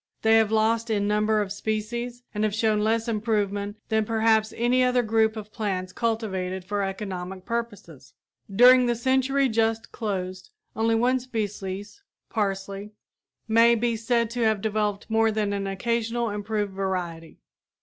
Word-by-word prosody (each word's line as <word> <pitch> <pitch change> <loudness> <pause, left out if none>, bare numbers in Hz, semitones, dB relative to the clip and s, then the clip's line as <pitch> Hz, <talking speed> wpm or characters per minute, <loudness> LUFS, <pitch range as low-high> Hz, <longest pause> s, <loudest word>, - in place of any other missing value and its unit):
They 220 0 +6
have 220 -1 +3
lost 225 +1 +2
in 205 -2 +1
number 210 +1 +2
of 200 -2 -4
species, 235 +4 -3
and 210 0 -1
have 210 -1 0
shown 220 -1 +2
less 225 +2 +1
improvement 205 -2 -1
than 220 0 +2
perhaps 220 0 +2
any 245 +2 +3
other 250 -1 +2
groups 220 0 +2
of 215 0 -8
plants 185 -4 -3
cultivated 190 -5 -2
for 205 +1 -2
economic 190 -2 -5
purposes. 205 - -6 0.4
During 250 +4 +7
the 240 - +1
century 265 +3 +2
just 225 -1 0
closed 185 - -4 0.3
only 225 0 +2
one 250 +3 +2
species, 205 - -5 0.3
parsley, 200 -1 -3 0.5
may 230 +1 +5
be 235 0 0
said 230 0 0
to 245 0 -3
have 220 -2 +2
developed 210 -1 -1
more 225 0 +2
than 210 -1 -1
an 200 -1 -2
occasional 230 +3 -1
improved 205 -1 -2
variety. 180 -4 -4
220 Hz, 150 wpm, -25 LUFS, 200-230 Hz, 0.5 s, During